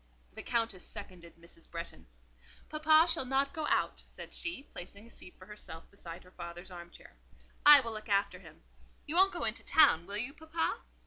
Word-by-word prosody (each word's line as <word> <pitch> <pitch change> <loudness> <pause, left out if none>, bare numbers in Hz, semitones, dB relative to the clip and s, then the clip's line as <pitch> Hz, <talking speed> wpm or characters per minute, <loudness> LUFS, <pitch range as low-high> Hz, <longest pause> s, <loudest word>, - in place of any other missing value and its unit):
The - - -7
Countess 225 -6 -1
seconded 170 -3 -8
Mrs. 170 0 -13
Bretton. 170 - -7 0.6
"Papa 310 +1 +5
shall 335 - +2
not 270 +2 0
go 310 -2 -2
out," - - 0
said - - -10
she, 340 -6 -4
placing 200 -2 -11
a 235 - -17
seat 180 - -12
for 185 - -14
herself 200 -5 -9
beside 170 -4 -10
her 180 - -18
father's 175 +1 -8
arm 175 -1 -9
chair. - - -15 0.5
"I 295 -1 +11
will 230 -2 -4
look 215 0 -7
after 200 0 +1
him. - - -16 0.4
You 300 - -5
won't 380 +3 +5
go - - -4
into - - -1
town, 170 - +5
will 200 +1 -3
you, 245 +6 -3
papa?" 320 +1 -2
210 Hz, 190 wpm, -32 LUFS, 175-295 Hz, 0.6 s, I